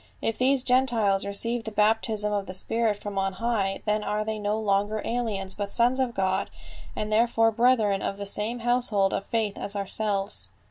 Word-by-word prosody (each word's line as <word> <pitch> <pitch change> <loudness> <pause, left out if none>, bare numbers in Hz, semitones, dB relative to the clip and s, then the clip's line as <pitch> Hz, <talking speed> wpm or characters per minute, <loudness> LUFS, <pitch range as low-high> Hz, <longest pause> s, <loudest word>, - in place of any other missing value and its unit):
If 225 - -2
these 260 0 +3
Gentiles 230 -7 +2
receive 230 +4 -2
the 220 - -4
baptism 210 0 +1
of 200 -1 -2
the 185 - -5
Spirit 225 +2 +2
from 205 -1 -4
on 195 0 -1
high, 200 -3 -1
then 210 0 0
are 210 0 -2
they 220 0 -3
no 205 +1 -1
longer 205 0 0
aliens 215 -5 -2
but 200 -1 -5
sons 245 +2 +2
of 255 -3 -1
God 190 -1 0 0.5
and 215 0 -3
therefore 225 0 +3
brethren 220 -4 +2
of 195 - -3
the 200 - -5
same 215 +4 -2
household 235 -5 +2
of 195 - -3
faith 220 -3 -1
as 205 - -5
ourselves." 200 0 -2
215 Hz, 185 wpm, -26 LUFS, 200-230 Hz, 0.5 s, these